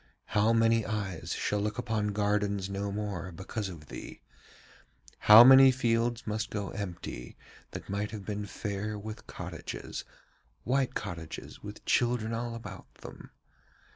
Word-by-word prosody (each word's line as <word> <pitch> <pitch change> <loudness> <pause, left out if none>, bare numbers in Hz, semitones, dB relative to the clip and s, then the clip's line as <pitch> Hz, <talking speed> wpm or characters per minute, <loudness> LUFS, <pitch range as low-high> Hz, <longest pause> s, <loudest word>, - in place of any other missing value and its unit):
How 105 +2 +4
many 115 0 +4
eyes 100 -6 -3
shall 105 - 0
look 105 0 -2
upon 110 -3 -1
gardens 100 -1 0
no 100 +1 -2
more 100 -3 -4
because 95 +4 -5
of 80 -4 -10
thee? - - -9 1.1
How 110 +2 +13
many 135 +1 +9
fields 120 -2 +1
must 110 +1 -2
go 100 -2 -3
empty 85 -10 -6 0.3
that - - -8
might 100 +1 -2
have 105 -3 -7
been 105 -1 -4
fair 105 +1 -4
with 110 +1 -8
cottages, - - -6 0.6
white 130 +1 +1
cottages 80 -2 -6
with 105 0 -9
children 120 -2 +1
all 115 0 -3
about 115 - -9
them? - - -11
105 Hz, 140 wpm, -30 LUFS, 100-115 Hz, 1.1 s, How